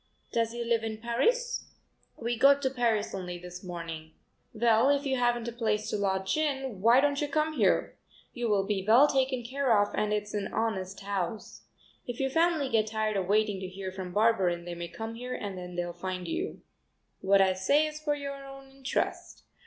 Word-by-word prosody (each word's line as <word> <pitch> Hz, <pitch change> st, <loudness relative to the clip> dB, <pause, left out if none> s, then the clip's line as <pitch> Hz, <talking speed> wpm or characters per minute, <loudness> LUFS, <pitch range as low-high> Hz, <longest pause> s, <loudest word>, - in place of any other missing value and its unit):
Does 230 Hz, -1 st, +1 dB
he 235 Hz, 0 st, -4 dB
live 230 Hz, -1 st, +1 dB
in 220 Hz, -1 st, -3 dB
Paris?" 470 Hz, -, 0 dB, 0.5 s
"We 235 Hz, +1 st, -2 dB
got 280 Hz, +4 st, +5 dB
to 265 Hz, -, +1 dB
Paris 230 Hz, -5 st, 0 dB
only 180 Hz, -2 st, -5 dB
this 180 Hz, +1 st, -9 dB
morning." 165 Hz, -3 st, -7 dB, 0.4 s
"Well, 230 Hz, +2 st, +3 dB
if 285 Hz, 0 st, +2 dB
you 265 Hz, -1 st, +1 dB
haven't 240 Hz, -1 st, +1 dB
a -, -, -2 dB
place 220 Hz, -2 st, -1 dB
to -, -, 0 dB
lodge 190 Hz, -2 st, 0 dB
in, 270 Hz, -9 st, -1 dB
why 235 Hz, +5 st, +6 dB
don't 285 Hz, 0 st, +1 dB
you 295 Hz, -, 0 dB
come 305 Hz, +2 st, 0 dB
here? -, -, +1 dB, 0.3 s
You 240 Hz, -2 st, -2 dB
will 200 Hz, -2 st, +3 dB
be 195 Hz, -2 st, -1 dB
well 230 Hz, +8 st, +7 dB
taken 260 Hz, -3 st, 0 dB
care 255 Hz, -2 st, +2 dB
of 205 Hz, 0 st, +1 dB
and 210 Hz, 0 st, 0 dB
it's 210 Hz, 0 st, -2 dB
an 205 Hz, -2 st, -2 dB
honest 195 Hz, -4 st, -2 dB
house. 200 Hz, +1 st, -4 dB, 0.4 s
If 245 Hz, -1 st, -5 dB
your 270 Hz, -1 st, 0 dB
family 325 Hz, -2 st, +2 dB
get 220 Hz, -4 st, +2 dB
tired 215 Hz, -1 st, -1 dB
of 190 Hz, -2 st, -1 dB
waiting 210 Hz, -1 st, +2 dB
to 185 Hz, -, -5 dB
hear 190 Hz, 0 st, -6 dB
from 185 Hz, -1 st, -6 dB
Barberin 190 Hz, -5 st, +2 dB
they 175 Hz, -, -5 dB
may 170 Hz, 0 st, -5 dB
come 225 Hz, +6 st, -6 dB
here 250 Hz, +2 st, -5 dB
and 200 Hz, -2 st, -5 dB
then 180 Hz, -1 st, -7 dB
they'll 175 Hz, 0 st, -2 dB
find 185 Hz, +1 st, -5 dB
you. 345 Hz, +5 st, -4 dB, 0.6 s
What 195 Hz, +1 st, +4 dB
I 190 Hz, -1 st, +4 dB
say 280 Hz, +12 st, +3 dB
is 305 Hz, 0 st, -5 dB
for 295 Hz, -1 st, 0 dB
your 280 Hz, -1 st, -6 dB
own 270 Hz, 0 st, -11 dB
interest. 270 Hz, 0 st, -3 dB
225 Hz, 200 wpm, -29 LUFS, 190-265 Hz, 0.6 s, well